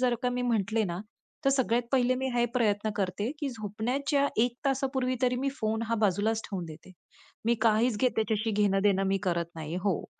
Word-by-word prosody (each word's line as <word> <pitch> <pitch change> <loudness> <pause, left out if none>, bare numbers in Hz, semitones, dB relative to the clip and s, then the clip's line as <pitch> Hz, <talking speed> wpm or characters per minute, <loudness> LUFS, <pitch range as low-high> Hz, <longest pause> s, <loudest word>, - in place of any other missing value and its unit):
जर 250 -1 +3
का 250 - +2
मी 250 0 -2
म्हटले 225 -2 +1
ना, 175 -1 -3 0.4
तर 275 - +5
सगळ्यात 245 -3 +2
पहिले 255 -1 +3
मी 265 +1 -1
हे 240 - +3
प्रयत्न 215 -3 +1
करते 200 +3 -1
की 285 - -1
झोपण्याच्या 245 +6 -1 0.2
1 245 0 -3
तासापूर्वी 265 -1 0
तरी 250 0 +2
मी 270 +2 0
फोन 220 +1 0
हा 230 - +1
बाजूलाच 210 +3 +1
ठेवून 190 -4 -4
देते. 160 +3 -12 0.5
मी 235 - +4
काहीच 225 0 +3
घे 255 - +5
त्याच्याशी 220 0 0
घेणं 200 -1 +2
देणं 195 -1 +3
मी 195 0 +2
करत 170 -3 0
नाही. 155 0 -5
हो. 185 -1 -1
225 Hz, 195 wpm, -29 LUFS, 200-250 Hz, 0.5 s, तर